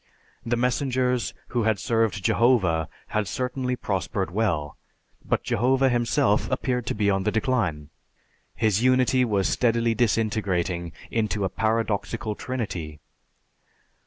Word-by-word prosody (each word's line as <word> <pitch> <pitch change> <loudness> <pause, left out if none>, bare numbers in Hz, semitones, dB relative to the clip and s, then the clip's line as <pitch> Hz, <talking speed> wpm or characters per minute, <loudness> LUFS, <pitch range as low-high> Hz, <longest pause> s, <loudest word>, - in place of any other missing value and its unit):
The 120 +1 0
messengers 125 0 0
who 120 - 0
had 110 -2 +2
served 110 -1 0
Jehovah 95 -10 +2 0.2
had 110 -2 -1
certainly 125 +4 -2
prospered 95 -3 -2
well; 85 -8 -1 0.5
but - - -1
Jehovah 130 +3 +2
Himself 120 -1 +1
appeared 125 0 -1
to - - -1
be 100 -2 +2
on 95 0 +1
the 105 - 0
decline. 100 - -1 0.6
His 110 -2 +1
Unity 130 0 +3
was 100 -5 +1
steadily 115 -1 +2
disintegrating 100 -7 0 0.2
into 105 -3 0
a - - -1
paradoxical 110 +1 -1
Trinity. 95 -12 -5
110 Hz, 120 wpm, -25 LUFS, 95-125 Hz, 0.6 s, Unity